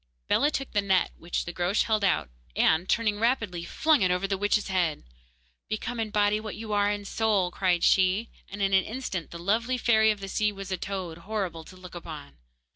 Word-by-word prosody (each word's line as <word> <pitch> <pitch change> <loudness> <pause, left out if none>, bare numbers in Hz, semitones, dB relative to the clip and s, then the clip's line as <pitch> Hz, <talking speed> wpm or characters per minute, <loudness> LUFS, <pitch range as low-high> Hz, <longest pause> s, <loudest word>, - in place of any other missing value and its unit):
Bellah 290 - +3
took 275 -3 -4
the 205 - +2
net 190 -2 +2
which 170 - -3
the 175 - -6
Groac'h 180 +4 +1
held 215 -2 0
out, 185 - +1 0.2
and, 160 +4 +3
turning 215 -3 +1
rapidly, 225 -7 0
flung 305 - +2
it 185 - +3
over 180 +2 +1
the 195 - 0
witch's 205 +2 +1
head. 175 -5 0 0.7
'Become 225 +2 -3
in 220 -1 -1
body 210 0 +2
what 215 -1 -6
you 215 -1 -5
are 205 0 +3
in 205 0 -3
soul!' 200 -4 +1
cried 180 -2 +1
she, 190 +4 +3 0.2
and 200 0 -4
in 195 0 +1
an 190 - +5
instant 215 -7 -4
the 170 - -8
lovely 225 +8 0
fairy 220 -3 +4
of 210 -1 0
the 195 - -6
sea 210 +2 +1
was 195 -1 -8
a 185 - 0
toad, 185 -4 -5
horrible 185 -4 -4
to 185 - -13
look 185 -1 -12
upon. 155 - -9
200 Hz, 210 wpm, -27 LUFS, 180-215 Hz, 0.7 s, an